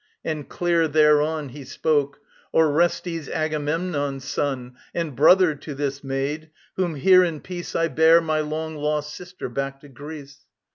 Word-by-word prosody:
And 155 -3 -4
clear 170 -2 +1
thereon 150 0 +3
He 140 +3 -10
spoke: 145 +1 -1 0.3
"Orestes, 165 0 +1
Agamemnon's 150 -2 -2
son, 130 -3 -3 0.2
And 165 -5 -2
brother 175 +5 +5
to 145 0 -8
this 140 0 -3
maid, 140 +4 -3 0.3
whom 175 -4 -1
here 185 +6 +6
in 165 -4 -2
peace 175 +1 -7
I 165 0 +2
bear, 160 +3 +5
my 155 -2 -1
long 155 +1 -3
lost 150 0 -2
sister, 180 0 -8
back 135 +2 -4
to 145 - -14
Greece." 145 +1 -10
150 Hz, 145 wpm, -23 LUFS, 145-165 Hz, 0.3 s, here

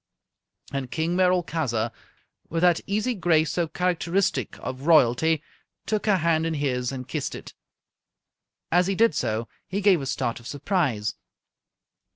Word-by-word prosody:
And 135 -2 -3
King 165 +5 -1
Merolchazzar, 160 -11 +1 0.6
with 165 0 -1
that 175 -2 +4
easy 215 +5 0
grace 165 -6 +2
so 175 -2 0
characteristic 180 +2 0
of 130 +3 -6
Royalty, 155 +1 +4 0.4
took 215 -1 -1
her 200 -2 +4
hand 165 -1 +1
in 165 - -2
his 125 -4 -1
and 130 -2 -6
kissed - - -3
it. - - -10 1.2
As 180 +2 +4
he 195 - 0
did 225 -2 +4
so, 115 -5 -1 0.2
he 195 +1 -2
gave 190 -5 +4
a 135 - -4
start 120 -2 -2
of 120 - -11
surprise. 145 - -1
160 Hz, 145 wpm, -25 LUFS, 130-180 Hz, 1.2 s, that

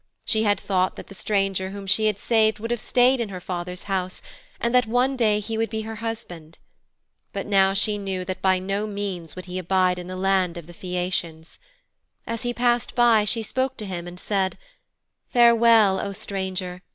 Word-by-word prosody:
She 220 - +2
had 205 -2 +2
thought 185 -2 0
that - - -9
the - - -10
stranger 195 -2 -1
whom 200 0 -7
she 205 +3 +2
had 210 -2 0
saved 220 0 +2
would 230 +2 -5
have 240 -2 -1
stayed 255 +1 +3
in 230 -3 -2
her 185 -2 -6
father's 180 0 -5
house, 185 -2 -3 0.4
and 235 +1 0
that 250 -2 +4
one 250 +4 +2
day 215 -4 +2
he 220 +1 -4
would 225 - 0
be 220 -1 -3
her 220 0 -6
husband. 180 -8 -6 0.8
But 195 - -3
now 195 -1 +4
she 210 +1 +1
knew 190 -2 -3
that 185 0 -5
by 190 -1 +3
no 195 +3 -2
means 195 -6 -5
would 185 - -8
he 185 0 -4
abide 185 0 +2
in 175 - -7
the 185 0 -6
land 190 -2 +1
of 170 - -8
the 175 - -13
Phæacians. 180 -3 -4 0.7
As 230 -1 -4
he 245 -1 -1
passed 240 0 0
by, 235 -3 +5
she 225 +2 +1
spoke 260 +4 -1
to 215 - -4
him 175 -3 -5
and 175 +1 -9
said, 195 -2 -1 0.7
'Farewell, 230 -4 +5
O 200 - -3
Stranger! 190 -3 -4
195 Hz, 200 wpm, -24 LUFS, 185-225 Hz, 0.8 s, by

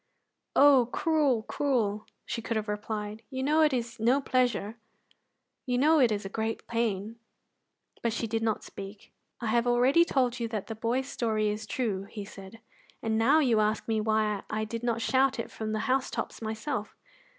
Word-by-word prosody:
"Oh, 275 -4 +6
cruel, 295 -8 +2
cruel!" 220 -7 -1 0.2
she 230 - -3
could 230 0 -2
have 215 0 -3
replied; 210 0 -4
"you 260 -1 -3
know 305 +3 +3
it 305 -1 +5
is 235 -2 -3
no 240 +5 +3
pleasure; 245 -5 0 0.9
you 250 -1 +1
know 310 +4 +5
it 245 -4 +4
is 205 -1 -2
a 195 - -6
great 225 0 -2
pain." 225 -2 -2 0.8
But 235 - 0
she 230 +1 -2
did 225 0 -2
not 220 -1 0
speak. 200 +1 -10 0.3
"I - - -3
have 235 +2 +2
already 250 +7 +5
told 255 -6 0
you 230 - -1
that 215 -3 -4
the 225 - -5
boy's 235 +4 -1
story 220 -5 0
is 210 +1 -4
true," 210 -7 -2
he 205 0 -7
said, 195 +2 -12 0.4
"and 220 -1 0
now 270 +8 +5
you 240 -6 +3
ask 215 0 0
me 220 -1 +1
why 215 -2 +1
I 215 0 -1
did 230 +1 -5
not 235 -1 -1
shout 265 0 +2
it 230 - -5
from 220 -1 -4
the 215 0 -1
housetops 260 -2 -1
myself. 220 +1 -4
230 Hz, 185 wpm, -29 LUFS, 215-255 Hz, 0.9 s, Oh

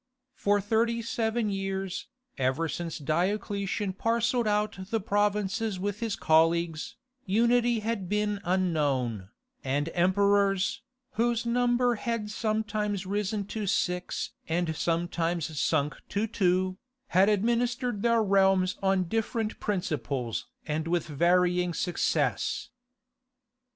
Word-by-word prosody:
For 205 0 +2
thirty 230 +3 +1
seven 225 -1 -1
years, 195 -1 -3 0.3
ever 135 +5 +1
since 165 0 -4
Diocletian 195 +5 -1
parcelled 230 +3 +1
out 210 -2 -1
the 225 - +1
provinces 205 0 0
with 205 +1 -2
his 230 -3 -1
colleagues, 165 +3 +2 0.3
unity 235 +3 +3
had 210 -4 -2
been 210 0 0
unknown, 145 - 0 0.3
and 145 +4 -1
emperors, 195 +1 +2 0.3
whose 235 0 0
number 245 +1 +2
had 230 -2 -3
sometimes 215 -2 -1
risen 205 +1 -1
to 215 -2 -3
six 180 -1 -1 0.2
and 165 -1 0
sometimes 170 -1 -1
sunk 150 -2 +1
to 205 +2 0
two, 185 -2 +1 0.3
had 190 +3 +4
administered 240 +2 0
their 235 -1 +3
realms 190 -2 +3
on 190 -1 +2
different 225 +3 -2
principles 150 - -2 0.2
and 155 +2 -2
with 170 -1 0
varying 175 +3 +2
success. 175 -2 0
195 Hz, 110 wpm, -28 LUFS, 175-220 Hz, 0.3 s, had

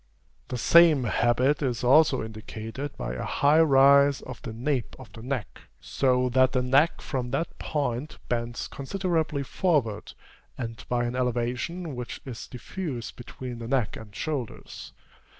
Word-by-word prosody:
The 125 - -4
same 160 +1 +6
habit 125 +5 +2
is 125 -4 -1
also 135 +1 +5
indicated 110 +5 -7
by - - -4
a 65 - -4
high 145 +3 +3
rise 140 -1 +5
of 125 - -9
the 120 - -6
nape 125 +2 -2
of - - -13
the 115 - -10
neck, 125 -3 -4 0.2
so 125 -1 +1
that 130 +1 +3
the 125 -1 +1
neck 140 +6 +3
from 125 -3 -3
that 145 +6 -3
point 140 -1 -2
bends 120 0 -2
considerably 160 -2 -2
forward, 135 - 0 0.4
and 115 -2 -6
by 120 -1 +1
an 120 +1 -2
elevation 125 +7 -2
which 125 -1 -6
is 125 -5 -7
diffused 125 -1 -6
between 120 0 -8
the 115 - -6
neck 125 -4 0
and 105 -2 -11
shoulders. 140 -1 -5
130 Hz, 150 wpm, -27 LUFS, 120-145 Hz, 0.4 s, same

